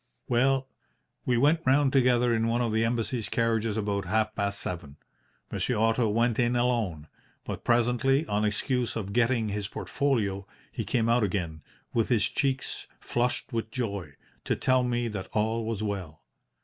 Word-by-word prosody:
"Well, 130 +2 +2 0.6
we 125 -1 +3
went 150 +6 +4
round 135 +1 +3
together 125 -2 +4
in 115 0 +1
one 115 +1 +1
of 115 - 0
the 110 +1 +2
Embassy's 115 0 -1
carriages 115 -2 0
about 100 -2 -1
half 110 +4 +1
past 100 -1 -2
seven. 85 -5 -5 0.5
Monsieur 125 - -1
Otto 115 +1 +2
went 115 +2 +1
in 120 0 +2
alone; 115 -11 0 0.4
but - - -5
presently, 125 +5 +2
on 105 -6 0
excuse 120 +3 0
of 100 -3 -4
getting 120 -1 +2
his 100 -1 -3
portfolio, 105 -7 -1 0.2
he - - -4
came 115 -2 +1
out 120 0 +3
again, 90 -6 -2 0.3
with 115 -2 +1
his 120 -4 +3
cheeks 135 -1 -1
flushed 120 +2 -1
with 115 -1 -2
joy, 100 - -4 0.3
to - - +1
tell 130 0 +2
me 120 -1 0
that 100 -4 -5
all 110 +1 0
was 110 -2 -2
well. 95 -7 -4
115 Hz, 160 wpm, -28 LUFS, 105-125 Hz, 0.6 s, went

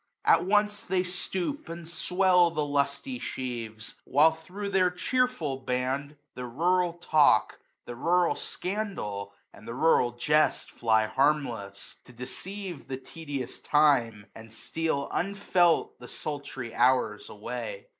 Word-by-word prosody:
At - - +5
once 210 +1 +2
they 185 0 +1
stoop 185 - -3
and 165 0 -7
swell 180 +1 +3
the 155 -3 -1
lusty 145 - -1
sheaves; 115 -4 -5
While 150 +4 +5
thro' 180 +6 -7
their 190 -2 +3
cheerful 180 - 0
band, 135 +3 -2 0.2
the 125 -1 -6
rural 175 +7 +1
talk. 155 -3 +3 0.3
The 120 - -7
rural 175 +6 +2
scandal, 180 - -4 0.2
and 105 - -14
the 115 - -5
rural 130 -5 +3
jest. 150 +5 +1
Fly 110 -2 +2
harmless; 120 -7 -1
to 125 - -15
deceive 180 - -7
the 130 - -4
tedious 145 -2 -7
time, 135 -8 +3
160 - - -12
And 110 0 -13
steal 140 +4 -2
unfelt 180 -3 +1
the 125 - -10
sultry 140 -6 -6
hours 130 - +2
away. - - -6
150 Hz, 130 wpm, -28 LUFS, 125-180 Hz, 0.3 s, At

